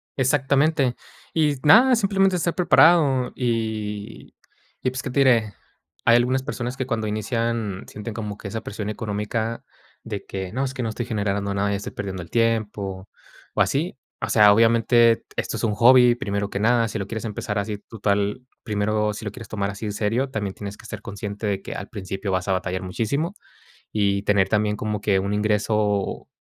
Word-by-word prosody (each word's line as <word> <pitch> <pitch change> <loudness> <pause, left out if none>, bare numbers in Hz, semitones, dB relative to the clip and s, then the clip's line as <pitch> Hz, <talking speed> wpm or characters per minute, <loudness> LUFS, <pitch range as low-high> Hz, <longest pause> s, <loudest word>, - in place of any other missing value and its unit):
Exactamente, 135 0 +2 0.4
y 150 -3 +2
nada, 245 - +7
simplemente 195 -3 +2
estar 170 0 -1
preparado. 155 -8 +5
Y, 110 -4 -3 0.5
pues, 130 +1 -1
¿qué - - -4
te 140 - 0
diré? 115 -6 +4 0.5
Hay 115 - +6
algunas 125 +2 +2
personas 125 -1 -4
que, 130 - -2
cuando 115 -3 -1
inician, 110 -2 -2
sienten 105 +2 -7
como 105 -2 -5
que - - -8
esa 110 +3 -4
presión 105 0 -5
económica 110 +2 -3 0.4
de 105 -3 -6
que: 95 -2 -5
"No, 130 +3 0
es 130 -1 -3
que 130 - -4
no 115 - -1
estoy 115 +2 -4
generando 100 -3 -1
nada, 100 +1 0
ya 100 - 0
estoy 105 +5 -7
perdiendo 95 -3 -5
el 85 - -14
tiempo", 105 -4 -1 0.4
o - - +1
así. 160 +7 0 0.2
O - - -3
sea, 105 -2 +7
obviamente 115 +1 +5
t - - -28
esto - - -2
es - - -5
un 105 -2 +1
hobby, 125 +2 +6
primero 100 -5 -2
que 100 - -3
nada. 115 +1 +3
Si 110 - -4
lo 100 - -3
quieres 110 +3 -5
empezar 105 -1 -3
así, 105 +1 -3
total, 105 +1 -1 0.2
primero, 105 0 0
si 105 - -8
lo 105 - -3
quieres 115 0 -10
tomar 100 -2 -2
así 100 +2 -6
en 105 - -2
serio, 115 +6 0
también 100 -5 -3
tienes 100 0 -7
que - - -13
ser 105 -1 -7
consciente 100 +1 -6
de 100 -2 -1
que - - -7
al 100 - -6
principio 95 -1 -4
vas 95 +1 -1
a 95 - +2
batallar 95 0 -2
muchísimo 140 - -2 0.6
y 100 -2 +1
tener 100 -2 +3
también 105 0 +1
como 105 -1 -3
que 100 -2 +2
un 100 +2 -1
ingreso, 105 -1 0
110 Hz, 190 wpm, -23 LUFS, 100-125 Hz, 0.6 s, nada